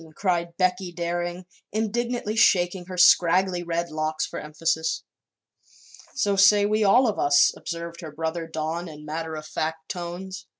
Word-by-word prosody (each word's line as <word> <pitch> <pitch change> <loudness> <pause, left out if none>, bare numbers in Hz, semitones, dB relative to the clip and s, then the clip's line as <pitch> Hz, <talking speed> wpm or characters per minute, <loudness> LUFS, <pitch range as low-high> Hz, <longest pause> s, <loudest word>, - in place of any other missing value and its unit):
cried 170 -3 -1
Becky 185 0 0
Daring, 175 +1 -3 0.3
indignantly 225 +1 -2
shaking 180 -4 +3
her 185 0 -8
scraggly 180 +1 +4
red 170 0 -3
locks 155 0 -1
for - - -6
emphasis. 160 +1 -2 1.1
"So 205 -7 +1
say 205 +1 +6
we 215 +1 +1
all 240 +6 +5
of 210 - -1
us," 145 0 +5
observed 170 0 -6
her 160 - -7
brother 160 +2 -4
Don 160 +2 -4
in 150 -1 -11
matter 160 +1 -4
of 155 0 -7
fact 160 +1 -4
tones. 185 +1 -6
175 Hz, 145 wpm, -25 LUFS, 160-190 Hz, 1.1 s, say